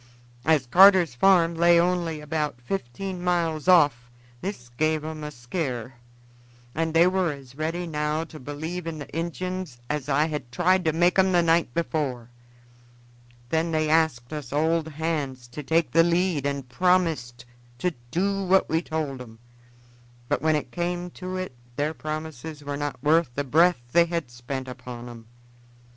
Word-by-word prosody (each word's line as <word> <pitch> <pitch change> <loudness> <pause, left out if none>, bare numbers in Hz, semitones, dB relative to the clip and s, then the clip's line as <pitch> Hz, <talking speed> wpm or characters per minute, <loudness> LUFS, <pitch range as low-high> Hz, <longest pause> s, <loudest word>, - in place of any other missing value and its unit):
As 155 -3 +3
Carter's 180 +2 +6
farm 170 +5 +4
lay 170 +1 +5
only 170 -3 0
about 150 -3 -2
fifteen 180 +6 -5
miles 170 -3 0
off 145 -9 +4 0.3
this 185 -11 -6
gave 155 +5 0
'em 155 -1 -6
a 150 - -4
skear, 125 - -4 0.8
and 160 0 -1
they 165 +1 +7
were 185 -2 +2
as 135 -3 -11
ready 160 +5 -3
now 150 -1 -1
to 160 -1 -11
believe 160 +6 -5
in 165 -1 -4
the 145 - -7
Injuns 175 -2 -4
as 150 -2 -3
I 145 +2 +3
had 150 -6 -5
tried 180 +5 +2
to 160 - +3
make 175 +4 +3
'em 190 0 +4
the 175 -1 +4
night 165 -4 +2
before. 135 -8 -2 1.2
Then 165 +2 0
they 155 -1 +1
asked 155 -6 +1
us 150 -5 -6
old 160 +2 +1
hands 145 -5 -3
to 135 +5 -7
take 160 +3 +1
the 165 - +6
lead 170 -4 +1
and 140 -2 -3
promised 150 -6 +1 0.3
to 180 +6 -1 0.2
do 195 +6 0
what 190 +1 +3
we 160 +1 +1
told 155 -6 -3
'em, 115 -2 -11 0.9
but - - 0
when 155 0 +3
it 150 - -3
came 175 0 -3
to 185 +1 -6
it 185 -8 -5 0.2
their 150 +3 -1
promises 155 -1 -6
were 145 0 -4
not 145 -3 -4
worth 160 +1 +3
the 145 - -1
breath 160 +1 +3
they 170 +4 +5
had 170 -7 -3
spent 130 +2 -6
upon 125 -1 -8
'em. 115 -2 -11
155 Hz, 165 wpm, -25 LUFS, 140-170 Hz, 1.2 s, they